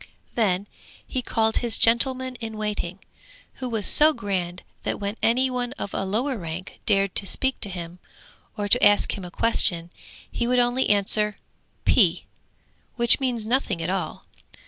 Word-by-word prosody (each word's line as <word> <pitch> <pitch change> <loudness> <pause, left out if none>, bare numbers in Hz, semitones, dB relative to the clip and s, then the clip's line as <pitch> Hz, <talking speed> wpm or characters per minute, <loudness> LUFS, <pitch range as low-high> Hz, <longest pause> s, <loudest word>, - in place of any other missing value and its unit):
Then 200 -4 +1 0.4
he 260 - -3
called 225 -2 0
his 235 -3 0
gentleman 255 +2 +3
in 225 -2 -7
waiting, 205 -3 -3 0.6
who 255 - -3
was 220 -4 -1
so 310 +1 +6
grand 185 -6 -3 0.2
that - - -3
when 200 +1 -3
any 250 +3 +3
one 250 0 -2
of 200 - -6
a - - -1
lower 240 +7 -1
rank 170 +2 -7
dared 195 -3 +2
to 195 - +2
speak 265 +6 -1
to 205 - -2
him, 175 -1 -7 0.6
or 205 -1 -2
to 245 +5 +3
ask 205 0 +4
him 195 - -7
a - - -7
question, 175 -5 +2 0.4
he 235 - -2
would 250 +1 +2
only 245 +1 +2
answer 210 +1 +2 0.5
'P,' - - +3 0.7
which 235 -1 +3
means 245 -5 -2
nothing 225 -6 0
at 165 +2 -2
all. 190 - -4
215 Hz, 165 wpm, -24 LUFS, 195-245 Hz, 0.7 s, so